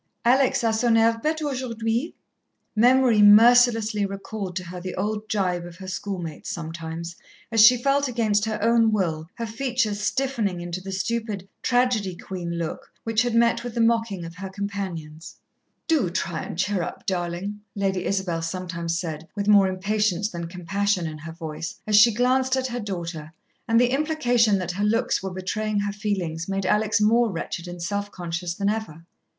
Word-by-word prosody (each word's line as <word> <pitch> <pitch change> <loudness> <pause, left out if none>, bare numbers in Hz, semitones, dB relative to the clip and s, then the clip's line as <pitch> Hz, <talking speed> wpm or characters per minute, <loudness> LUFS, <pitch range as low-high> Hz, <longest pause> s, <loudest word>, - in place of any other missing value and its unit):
"Alex 255 +1 +3
a 225 -1 +2
son 225 +1 +3
air 230 0 +3
bête 315 0 0
aujourd'hui." 240 0 -2 0.6
Memory 245 -1 +5
mercilessly 225 0 +6
recalled 195 -1 -5
to 185 - -3
her 180 +1 -8
the 185 0 -5
old 215 +1 -3
gibe 180 -4 0
of 175 -1 -10
her 190 +1 -10
schoolmates 185 -4 -5
sometimes, 165 0 -6 0.4
as 225 -2 +6
she 245 +3 +8
felt, 275 +3 +1
against 220 -4 +1
her 220 -1 -2
own 230 -1 +4
will, 165 -6 -1
her 230 - -4
features 225 -2 -1
stiffening 215 -4 -1
into 175 +1 -5
the 195 +1 -7
stupid 210 -1 -3
"tragedy 245 -7 +1
queen" 175 -1 -5
look 165 -2 -5
which 225 -1 +1
had 245 -1 0
met 235 0 +3
with 245 -1 -6
the - - -1
mocking 225 -6 +1
of 165 - -8
her 190 0 -6
companions. 185 -6 -6 0.5
"Do 300 - +2
try 170 -2 -2
and - - -7
cheer 195 0 0
up, 170 - -6
darlin'," 180 +3 -3 0.2
Lady 195 -2 -1
Isabel 190 -4 -1
sometimes 170 -1 -3
said, 160 -2 -5
with 200 -1 -2
more 200 -2 +6
impatience 205 +1 0
than 170 -1 -5
compassion 185 +2 -1
in 155 -1 -5
her 160 +2 -8
voice, 160 -1 -6
as 215 - +2
she 215 +3 +8
glanced 255 +3 +2
at 260 - -1
her 245 -1 -3
daughter; 170 -6 -5 0.3
and 230 0 +4
the 245 0 +3
implication 245 -8 +2
that 180 -2 -3
her 195 +3 -3
looks 230 +4 +1
were 190 - -3
betraying 205 +3 -2
her 205 0 -2
feelings 190 -5 -3
made 195 -1 -1
Alex 210 +2 +2
more 225 +2 +3
wretched 170 0 -5
and 175 -1 -7
self 200 +3 -2
conscious 175 -1 -4
than 200 +1 -1
ever. 205 -7 -3
205 Hz, 175 wpm, -24 LUFS, 175-230 Hz, 0.6 s, she